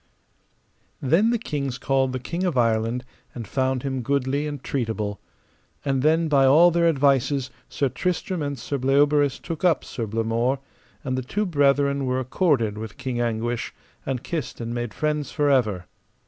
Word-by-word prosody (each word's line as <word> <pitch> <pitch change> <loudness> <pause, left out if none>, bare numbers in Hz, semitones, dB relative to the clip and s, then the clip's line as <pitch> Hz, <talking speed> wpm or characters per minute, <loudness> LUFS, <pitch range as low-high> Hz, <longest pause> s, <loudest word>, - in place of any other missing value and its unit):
Then 165 - +3
the 235 - +2
kings 140 - -3
called 135 -1 +1
the 130 - -2
King 170 +8 -4
of 175 -8 0
Ireland, 115 +1 +1 0.3
and 115 -4 -6
found 130 0 0
him 135 -2 -2
goodly 140 +3 0
and 145 -3 -6
treatable. 110 -5 -2 0.7
And 135 -2 +1
then, 160 +3 +3
by 140 -3 +4
all 165 +6 +7
their 170 0 +3
advices, 135 -3 +2 0.2
Sir 140 - 0
Tristram 180 +4 -2
and 145 -1 -3
Sir 135 +4 -3
Bleoberis 145 +1 +3
took 165 -1 -6
up 175 -3 +3
Sir 115 -3 -4
Blamore, 115 +4 0 0.5
and 130 -3 -1
the - - -2
two 205 +12 -2
brethren 140 -4 +2
were 130 0 0
accorded 130 - +1
with 110 -1 -7
King 125 -2 -3
Anguish, 115 0 -2 0.3
and 130 -1 -3
kissed 165 -4 -4
and 115 0 -4
made 120 -1 -3
friends 150 0 -2
for 145 -2 +2
ever. 105 -9 +1
135 Hz, 165 wpm, -24 LUFS, 120-145 Hz, 0.7 s, all